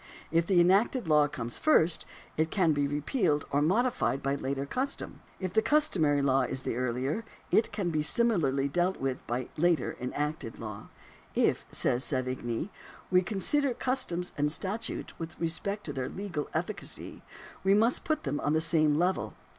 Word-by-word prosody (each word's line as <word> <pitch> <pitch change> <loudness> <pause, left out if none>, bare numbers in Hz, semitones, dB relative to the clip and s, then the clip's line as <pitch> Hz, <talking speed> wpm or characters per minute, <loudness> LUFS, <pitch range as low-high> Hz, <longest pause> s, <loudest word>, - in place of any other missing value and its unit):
If 165 +1 +2
the 190 -3 +4
enacted 195 +5 +3
law 150 -2 +5
comes 120 -4 -4
first, 175 - +3 0.3
it 160 +1 +1
can 175 -5 +3
be 145 -1 +1
repealed 150 - 0
or 145 +1 +2
modified 190 - +1
by 140 0 +1
later 140 0 -2
custom; 260 - -3 0.2
if 185 -2 -3
the 220 - +4
cus 300 +5 +2
tomary 145 -5 +2
law 135 -1 +3
is 130 +1 -2
the - - -2
earlier, 130 - -1 0.3
it 220 - +3
can 180 -4 -1
be 155 -1 +1
similarly 150 - +2
dealt 175 +6 +1
with 135 -1 -1
by 120 +1 -2
later 170 +1 +2
enacted 145 -1 -3
law. 105 -2 -7 0.2
" - - -26
If," - - +2
says 125 +1 0
Savigny,^ 130 - -2 0.2
" - - -21
we 180 0 +6
consider 240 +8 0
cus 255 +1 +1
toms 175 -2 -4
and 150 +1 +2
statutes 200 +7 -3
with 165 -1 -6
respect 200 +5 -1
to 145 - -5
their 130 -2 -3
legal 180 -7 -4
efficacy, 180 +6 -4 0.4
we 195 +1 +5
must 225 +4 +2
put 310 -1 -1
them 145 0 -1
on 145 - 0
the 155 - +3
same 155 -2 +3
level. 180 +3 0
160 Hz, 180 wpm, -30 LUFS, 140-195 Hz, 0.4 s, we